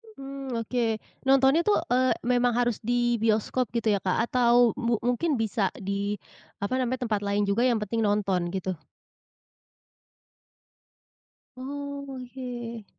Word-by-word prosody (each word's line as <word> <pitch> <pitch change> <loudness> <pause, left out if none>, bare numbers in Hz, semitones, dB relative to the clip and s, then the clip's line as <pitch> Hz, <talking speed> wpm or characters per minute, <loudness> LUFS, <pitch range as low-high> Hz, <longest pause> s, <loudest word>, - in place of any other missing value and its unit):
Mmm, 270 -2 -6
oke. 245 +1 -1 0.4
Nontonnya 270 +4 +5
tuh, 415 - +5 0.2
eee, 255 +1 +3
memang 245 0 +2
harus 240 -2 +1
di 240 0 +1
bioskop 225 +3 +1
gitu 225 -2 +2
ya, 200 - +2
Kak? 185 -1 0
Atau 240 -1 +4
mu 235 0 +1
mungkin 255 +6 +1
bisa 220 -3 0
di, 200 +1 -2 0.5
apa 255 +6 0
namanya, 255 0 -1
tempat 220 -4 0
lain 205 +1 +1
juga 200 +4 +1
yang 235 -3 +2
penting 225 +3 -2
nonton 200 -4 +1
gitu? 190 0 -2 2.9
Oke. 255 -4 -6
240 Hz, 125 wpm, -27 LUFS, 210-255 Hz, 2.9 s, Nontonnya